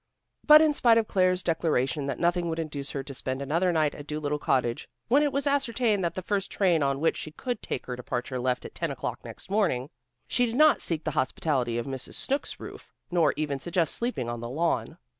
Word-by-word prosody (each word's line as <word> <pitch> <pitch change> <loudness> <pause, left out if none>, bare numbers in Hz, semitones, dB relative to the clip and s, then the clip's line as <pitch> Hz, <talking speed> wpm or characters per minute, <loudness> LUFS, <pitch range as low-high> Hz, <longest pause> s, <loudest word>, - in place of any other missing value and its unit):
But 305 +1 +9
in 310 -1 +3
spite 235 -5 +4
of 225 -2 +2
Claire's 185 -1 +2
declaration 150 -4 0
that 135 - -2
nothing 175 0 +1
would 160 - -2
induce 145 -4 -4
her 135 - -4
to 140 0 -8
spend 130 0 -3
another 165 +7 +1
night 155 -3 +1
at 145 - -10
Dolittle 150 -1 -2
Cottage, 120 -4 0 0.2
when 275 +5 +5
it 295 -1 +2
was 280 +1 -1
ascertained 245 -7 +1
that 170 - -1
the 185 - -4
first 200 0 -1
train 180 -5 +2
on 140 -1 +1
which 160 - +2
she - - -6
could 240 +8 -4
take - - -4
her 125 - -4
departure 125 +1 -4
left 125 0 -1
at - - -8
ten - - -2
o'clock - - -5
next - - -10
morning, 165 -11 +1 0.4
she 245 0 +2
did 230 - -4
not 305 +2 +5
seek 165 -2 0
the 155 - -1
hospitality 130 -3 0
of 120 - -2
Mrs. 135 -2 -6
Snooks' 275 +2 -2
roof, - - -10 0.2
nor 165 -5 +3
even 145 -3 -2
suggest 170 +2 0
sleeping 235 - -2
on 120 0 -4
the 120 0 -6
lawn. 165 +6 -1
160 Hz, 220 wpm, -27 LUFS, 135-205 Hz, 0.4 s, But